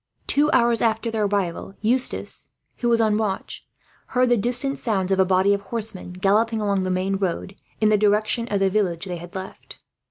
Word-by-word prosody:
Two 300 Hz, +2 st, +3 dB
hours 235 Hz, -1 st, +3 dB
after 225 Hz, 0 st, +1 dB
their 220 Hz, -2 st, 0 dB
arrival 195 Hz, -1 st, -2 dB
Eustace, 245 Hz, +4 st, -2 dB, 0.3 s
who 240 Hz, -, 0 dB
was 230 Hz, -1 st, +3 dB
on 215 Hz, -1 st, +2 dB
watch, 205 Hz, -3 st, -3 dB, 0.4 s
heard 250 Hz, -1 st, +2 dB
the 245 Hz, -, +5 dB
distant 250 Hz, +5 st, 0 dB
sounds 195 Hz, -5 st, -1 dB
of 190 Hz, -, +2 dB
a 190 Hz, -, +5 dB
body 190 Hz, +2 st, +3 dB
of 200 Hz, -, -1 dB
horsemen, 210 Hz, -3 st, -6 dB
galloping 215 Hz, +5 st, +1 dB
along 200 Hz, -2 st, 0 dB
the 185 Hz, -, -2 dB
main 185 Hz, +1 st, 0 dB
road 190 Hz, 0 st, -3 dB, 0.2 s
in 215 Hz, -, +3 dB
the 210 Hz, -1 st, +3 dB
direction 215 Hz, +3 st, +1 dB
of 205 Hz, -3 st, 0 dB
the 195 Hz, -, +3 dB
village 185 Hz, -4 st, 0 dB
they 180 Hz, -2 st, -4 dB
had 175 Hz, +2 st, -11 dB
left. 190 Hz, 0 st, -8 dB
210 Hz, 195 wpm, -23 LUFS, 190-230 Hz, 0.4 s, the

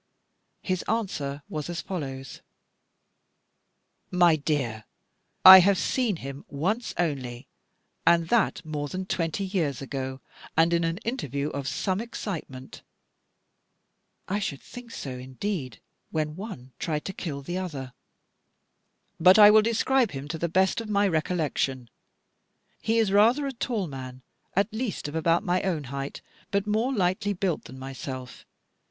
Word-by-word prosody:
His 185 Hz, -2 st, -1 dB
answer 150 Hz, -11 st, -2 dB
was 155 Hz, +1 st, -5 dB
as 170 Hz, -1 st, -3 dB
follows: 135 Hz, -7 st, -6 dB, 1.7 s
"My 175 Hz, -2 st, +5 dB
dear, 135 Hz, -8 st, -2 dB, 0.6 s
I 190 Hz, 0 st, +14 dB
have 195 Hz, +1 st, +4 dB
seen 225 Hz, +6 st, 0 dB
him 140 Hz, -2 st, -7 dB
once 190 Hz, -, -2 dB
only, 130 Hz, -8 st, -2 dB, 0.6 s
and 170 Hz, -1 st, +4 dB
that 225 Hz, -7 st, +2 dB
more 150 Hz, -2 st, -3 dB
than 185 Hz, +5 st, -4 dB
twenty 175 Hz, +2 st, -1 dB
years 170 Hz, -9 st, -1 dB
ago, 130 Hz, -1 st, -4 dB, 0.4 s
and 165 Hz, +1 st, +4 dB
in 170 Hz, 0 st, +2 dB
an 165 Hz, +1 st, -1 dB
interview 145 Hz, -, -2 dB
of 140 Hz, -1 st, -4 dB
some 190 Hz, +5 st, -1 dB
excitement" 165 Hz, -, -6 dB, 1.5 s
I 200 Hz, +3 st, 0 dB
should 145 Hz, -9 st, -4 dB
think 245 Hz, -1 st, -10 dB
so 140 Hz, -11 st, -6 dB
indeed, 130 Hz, -, -4 dB, 0.3 s
when 155 Hz, -1 st, -2 dB
one 185 Hz, -, -8 dB
tried 150 Hz, -2 st, -2 dB
to 190 Hz, -, -4 dB
kill 145 Hz, -7 st, -5 dB
the 175 Hz, +6 st, -3 dB
other 140 Hz, -9 st, -5 dB, 1.3 s
"but 185 Hz, +4 st, +7 dB
I 210 Hz, -1 st, +10 dB
will 215 Hz, 0 st, +7 dB
describe 230 Hz, +1 st, +2 dB
him 135 Hz, +1 st, -6 dB
to 160 Hz, +1 st, -4 dB
the 170 Hz, -, -1 dB
best 190 Hz, +6 st, +2 dB
of 220 Hz, -, -8 dB
my 200 Hz, -1 st, +3 dB
recollection. 155 Hz, -7 st, -1 dB, 0.9 s
He 225 Hz, +1 st, +1 dB
is 220 Hz, -4 st, +3 dB
rather 230 Hz, +8 st, +4 dB
a 275 Hz, -, -3 dB
tall 230 Hz, -4 st, -2 dB
man, 130 Hz, -3 st, -8 dB, 0.3 s
at 200 Hz, +3 st, +1 dB
least 220 Hz, -, -3 dB
of 145 Hz, -, -6 dB
about 165 Hz, +2 st, +2 dB
my 180 Hz, -2 st, +1 dB
own 170 Hz, -6 st, -1 dB
height, 140 Hz, 0 st, -5 dB, 0.3 s
but 200 Hz, 0 st, 0 dB
more 220 Hz, +5 st, +1 dB
lightly 200 Hz, -2 st, +1 dB
built 185 Hz, -3 st, -1 dB
than 130 Hz, -, -10 dB
myself. 130 Hz, -1 st, -7 dB
170 Hz, 145 wpm, -27 LUFS, 140-200 Hz, 1.7 s, I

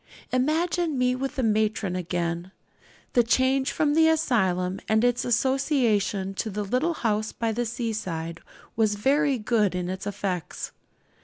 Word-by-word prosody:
Imagine 315 Hz, +4 st, +1 dB
me 250 Hz, 0 st, +2 dB
with 270 Hz, +2 st, -3 dB
the 260 Hz, -, -1 dB
matron 215 Hz, -3 st, +1 dB
again. 175 Hz, 0 st, -2 dB, 0.6 s
The 245 Hz, -, +6 dB
change 260 Hz, +3 st, +2 dB
from 295 Hz, -1 st, +1 dB
the 320 Hz, +1 st, +5 dB
asylum 190 Hz, -, +1 dB
and 220 Hz, +1 st, +3 dB
its 245 Hz, 0 st, +2 dB
associations 235 Hz, -6 st, +1 dB
to 220 Hz, -, -4 dB
the 210 Hz, +1 st, -3 dB
little 255 Hz, -, 0 dB
house 215 Hz, -3 st, -1 dB
by 230 Hz, -1 st, -2 dB
the 240 Hz, +2 st, -1 dB
seaside 190 Hz, -8 st, -4 dB, 0.4 s
was 215 Hz, -2 st, +2 dB
very 275 Hz, +5 st, +2 dB
good 210 Hz, -4 st, +1 dB
in 180 Hz, 0 st, -2 dB
its 190 Hz, +2 st, -5 dB
effects. 190 Hz, -4 st, -4 dB
225 Hz, 145 wpm, -26 LUFS, 195-265 Hz, 0.6 s, The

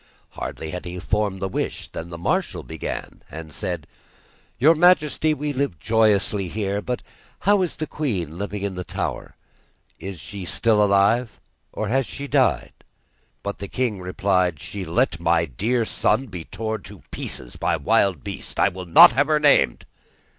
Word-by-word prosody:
Hardly 80 Hz, -, -6 dB
had 90 Hz, 0 st, -6 dB
he 90 Hz, +1 st, -6 dB
formed 100 Hz, 0 st, -1 dB
the -, -, +1 dB
wish 95 Hz, -, -4 dB
than 80 Hz, +1 st, -7 dB
the 85 Hz, -, -7 dB
marshal 85 Hz, -, -1 dB
began, 80 Hz, -2 st, -6 dB
and 80 Hz, -1 st, -8 dB
said: 90 Hz, -7 st, -3 dB, 0.7 s
'Your 150 Hz, +6 st, +6 dB
majesty, 155 Hz, -2 st, +3 dB
we 145 Hz, +1 st, -3 dB
live 135 Hz, -, -1 dB
joyously 105 Hz, -2 st, +2 dB
here, 100 Hz, +1 st, -2 dB
but 125 Hz, +2 st, -3 dB, 0.4 s
how 205 Hz, +1 st, +4 dB
is 180 Hz, -, -1 dB
the 155 Hz, -, -3 dB
queen 95 Hz, -, -3 dB
living 100 Hz, 0 st, -4 dB
in 100 Hz, -1 st, -2 dB
the 90 Hz, 0 st, -5 dB
tower? -, -, -4 dB, 0.6 s
Is 95 Hz, -3 st, -7 dB
she 100 Hz, +1 st, -7 dB
still 105 Hz, +4 st, +2 dB
alive, 105 Hz, +4 st, +2 dB, 0.3 s
or 110 Hz, -, -3 dB
has 130 Hz, +1 st, +1 dB
she 140 Hz, -, -6 dB
died?' 125 Hz, -, +1 dB, 0.6 s
But 100 Hz, 0 st, -4 dB
the 100 Hz, -, -5 dB
king 115 Hz, -3 st, -1 dB
replied: 90 Hz, -3 st, +1 dB
'She 100 Hz, +4 st, -6 dB
let 85 Hz, +1 st, +1 dB
my 85 Hz, 0 st, +2 dB
dear 110 Hz, -, 0 dB
son 130 Hz, -, +1 dB
be 90 Hz, -9 st, -8 dB
torn 110 Hz, 0 st, -4 dB
to 100 Hz, -3 st, -13 dB
pieces -, -, -7 dB
by -, -, 0 dB
wild 95 Hz, -, +2 dB
beasts; -, -, -7 dB
I -, -, +4 dB
will 95 Hz, -1 st, -8 dB
not 85 Hz, -, +9 dB
have 145 Hz, +2 st, +2 dB
her 155 Hz, -1 st, +3 dB
named. 145 Hz, -1 st, +3 dB
100 Hz, 170 wpm, -23 LUFS, 90-125 Hz, 0.7 s, not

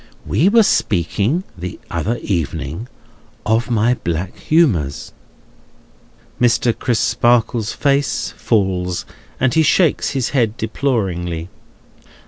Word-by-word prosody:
We 175 Hz, +7 st, +2 dB
were 225 Hz, +1 st, +5 dB
speaking, 105 Hz, -, +1 dB
the 90 Hz, +1 st, -7 dB
other 100 Hz, +8 st, -1 dB
evening, 80 Hz, -, -3 dB, 0.6 s
of 115 Hz, +3 st, +1 dB
my 115 Hz, +1 st, +2 dB
black 85 Hz, -5 st, -3 dB
humours." 105 Hz, -, +1 dB, 1.3 s
Mr. 120 Hz, -1 st, +3 dB
Crisparkle's 120 Hz, -2 st, +1 dB
face 140 Hz, 0 st, 0 dB
falls, 95 Hz, -5 st, 0 dB, 0.3 s
and 130 Hz, -1 st, +2 dB
he 160 Hz, -, +4 dB
shakes 160 Hz, +1 st, +2 dB
his 135 Hz, -3 st, -1 dB
head 115 Hz, -5 st, 0 dB
deploringly. 95 Hz, -9 st, -2 dB
110 Hz, 100 wpm, -18 LUFS, 90-130 Hz, 1.3 s, were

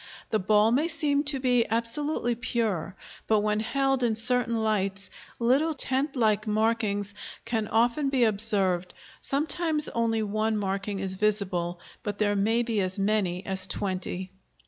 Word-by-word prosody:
The 215 Hz, -, +2 dB
ball 210 Hz, +3 st, +3 dB
may 285 Hz, +7 st, +2 dB
seem 295 Hz, -4 st, +1 dB
to 285 Hz, -1 st, +2 dB
be 250 Hz, -2 st, +3 dB
absolutely 235 Hz, +3 st, 0 dB
pure, 225 Hz, -7 st, -2 dB, 0.3 s
but 215 Hz, -1 st, +3 dB
when 210 Hz, 0 st, +1 dB
held 270 Hz, +4 st, 0 dB
in 235 Hz, -3 st, +2 dB
certain 235 Hz, +1 st, 0 dB
lights 200 Hz, -2 st, -1 dB, 0.3 s
little 275 Hz, +7 st, +2 dB
tent 270 Hz, +2 st, 0 dB
like 215 Hz, -3 st, +1 dB
markings 210 Hz, -2 st, 0 dB, 0.3 s
can 225 Hz, -2 st, -1 dB
often 240 Hz, +6 st, +2 dB
be 265 Hz, -3 st, +2 dB
observed; 200 Hz, -5 st, 0 dB, 0.3 s
sometimes 305 Hz, +2 st, 0 dB
only 225 Hz, -1 st, 0 dB
one 215 Hz, +1 st, 0 dB
marking 195 Hz, 0 st, -2 dB
is 190 Hz, -1 st, -2 dB
visible, 190 Hz, -4 st, 0 dB, 0.2 s
but 205 Hz, -1 st, -4 dB
there 205 Hz, -1 st, +1 dB
may 225 Hz, +4 st, +2 dB
be 225 Hz, -3 st, 0 dB
as 185 Hz, +1 st, -2 dB
many 195 Hz, -3 st, 0 dB
as 190 Hz, -1 st, -2 dB
twenty. 185 Hz, -1 st, -3 dB
220 Hz, 145 wpm, -27 LUFS, 200-245 Hz, 0.3 s, ball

